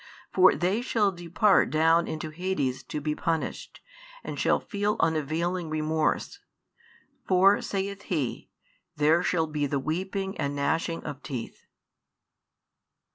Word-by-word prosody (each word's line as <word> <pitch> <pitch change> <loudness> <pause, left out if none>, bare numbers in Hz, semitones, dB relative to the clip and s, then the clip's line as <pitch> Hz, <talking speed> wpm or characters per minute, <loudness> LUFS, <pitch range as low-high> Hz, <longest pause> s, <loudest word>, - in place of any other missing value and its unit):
For 185 0 +6
they 190 +6 0
shall 215 -5 +1
depart 175 +4 +2
down 165 +2 +3
into 155 0 -5
Hades 155 -7 -2
to 150 - -4
be 150 +1 -1
punished, 165 +1 -3 0.4
and - - -6
shall - - +3
feel 205 0 -1
unavailing 165 +2 0
remorse. 155 - -1 0.9
For, 190 +2 +5
saith 200 0 -3
He, 145 -9 -3 0.5
there 155 +3 +3
shall 170 -2 +1
be 150 -2 -2
the 140 - -1
weeping 190 +7 -3
and 140 0 -1
gnashing 165 +3 -1
of 140 -1 -6
teeth. 125 -5 -7
165 Hz, 125 wpm, -27 LUFS, 155-190 Hz, 0.9 s, For